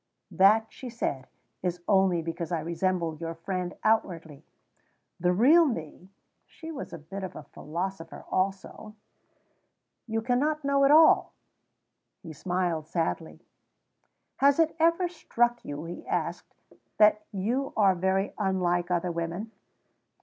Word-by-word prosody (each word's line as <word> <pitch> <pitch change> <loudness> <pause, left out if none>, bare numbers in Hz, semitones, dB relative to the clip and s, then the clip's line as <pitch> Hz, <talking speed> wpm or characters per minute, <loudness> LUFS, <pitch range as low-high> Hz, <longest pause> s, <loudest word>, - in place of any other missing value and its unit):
"That," 210 +4 +5
she 255 - -8
said, 140 - -3 0.3
"is 175 -1 -3
only 190 -4 +3
because 165 0 -5
I 170 - 0
resemble 170 0 -1
your 165 +1 -5
friend 180 +1 -4
outwardly. 165 -9 0 0.8
The 180 +1 +2
real 295 - +5
me 180 - -6 0.4
(she 325 0 -10
was 285 - -7
a - - -6
bit 190 +6 -8
of 160 -5 -8
philosopher 170 +2 -6
also) 195 +3 -3 1.1
you 225 0 -2
cannot 285 +5 0
know 280 0 +3
at - - +4
all." 315 +2 +6 0.9
He 165 -3 -8
smiled 175 -1 -2
sadly. 165 -1 -3 1.0
"Has 280 0 +4
it 325 -1 +2
ever 335 +3 +3
struck 240 -8 -1
you," 145 +2 -6
he 170 +1 -7
asked, - - -3 0.4
"that 210 0 +5
you 235 +8 -2
are 200 -3 +5
very 190 +2 0
unlike 180 -3 0
other 175 0 0
women?" 170 +6 -4
190 Hz, 130 wpm, -27 LUFS, 170-230 Hz, 1.1 s, all